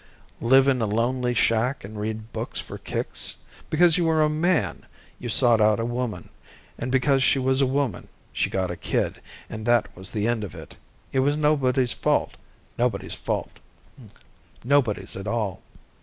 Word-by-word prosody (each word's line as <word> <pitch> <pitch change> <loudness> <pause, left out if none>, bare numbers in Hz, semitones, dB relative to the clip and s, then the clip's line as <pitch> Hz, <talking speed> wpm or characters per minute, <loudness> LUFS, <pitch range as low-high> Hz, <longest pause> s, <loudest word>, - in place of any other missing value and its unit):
Live 130 +3 +5
in 130 -3 +2
a 110 - +1
lonely 120 +3 0
shack 115 +4 +1
and 105 +2 -8
read 110 +1 -5
books - - -4
for - - -8
kicks? - - -4 0.3
Because 170 +2 +4
you 170 - +2
were 160 -1 +3
a 150 - +3
man, 160 +3 0 0.3
you 120 - -5
sought 115 -1 +5
out 105 0 +4
a 115 - -1
woman. 120 -2 -3 0.5
And 125 - -4
because 135 +1 +3
she 135 - +4
was 130 +1 +2
a 135 - +3
woman, 135 -8 -1 0.3
she - - 0
got 95 -2 -1
a - - -4
kid, - - -2 0.3
and 110 0 -7
that 120 -2 +2
was 95 +1 -8
the 105 0 -1
end 120 -2 0
of 100 - -7
it. - - -11 0.4
It 135 - +2
was 145 +3 +2
nobody's 135 -4 +2
fault, - - 0 0.4
nobody's - - 0 2.0
at 95 +2 -6
all. 105 -4 -2
125 Hz, 165 wpm, -25 LUFS, 110-135 Hz, 2.0 s, Live